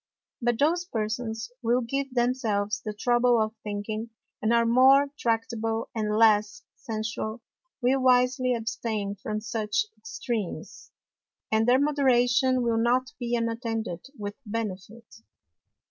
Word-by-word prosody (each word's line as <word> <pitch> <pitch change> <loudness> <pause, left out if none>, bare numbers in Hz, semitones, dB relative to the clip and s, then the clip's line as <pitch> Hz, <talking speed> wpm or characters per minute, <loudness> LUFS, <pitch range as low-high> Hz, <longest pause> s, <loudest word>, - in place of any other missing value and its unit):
But 240 -1 +1
those 335 +6 +2
Persons 225 - -3
who 230 - -7
will 250 - +2
give 275 +3 -3
themselves 225 -4 0
the 215 - -3
trouble 240 +2 +2
of 215 0 0
thinking, 215 +2 -4 0.3
and 215 - +1
are 235 0 +4
more 265 +4 +5
tractable 225 -2 -1
and 215 -1 -1
less 220 - +3
sensual, 220 0 -4 0.4
will 260 +2 +3
wisely 255 0 +3
abstain 225 -3 -3
from 215 +1 -4
such 220 - -1
Extreams, 235 - -5 0.6
and 220 +1 +2
their 255 +1 +5
Moderation 260 -2 +3
will 230 -1 +1
not 250 +2 +1
be 240 0 -1
unattended 230 -5 -3
with 205 -1 -5
Benefit. 220 0 -5
230 Hz, 125 wpm, -27 LUFS, 220-250 Hz, 0.6 s, more